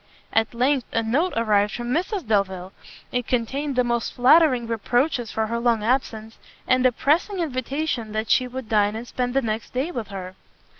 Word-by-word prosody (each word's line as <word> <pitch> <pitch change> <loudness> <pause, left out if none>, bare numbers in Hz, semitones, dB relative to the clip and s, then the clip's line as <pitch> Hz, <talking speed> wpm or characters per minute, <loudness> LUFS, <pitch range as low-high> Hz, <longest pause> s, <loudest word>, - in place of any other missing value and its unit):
At 225 +1 +1
length 255 +1 +1
a 230 - 0
note 280 +12 +1
arrived 210 -3 +2
from 240 0 -4
Mrs 365 - -1
Delvile. 190 -3 -1 0.4
It 245 -1 -2
contained 265 +4 -1
the 250 - +3
most 235 -1 -2
flattering 255 -1 +5
reproaches 240 +3 0
for 220 - -1
her 230 +2 -2
long 235 -2 +1
absence, 225 -2 -1 0.3
and 255 0 +3
a - - +2
pressing 325 - +1
invitation 270 -5 -2
that 220 +1 -2
she 255 - +3
would 255 -1 -7
dine 210 -1 +2
and 230 +2 -6
spend 245 +1 -3
the 270 - +2
next 220 0 -3
day 275 +7 -1
with 235 - -4
her. 185 -2 -7
240 Hz, 185 wpm, -23 LUFS, 220-265 Hz, 0.4 s, flattering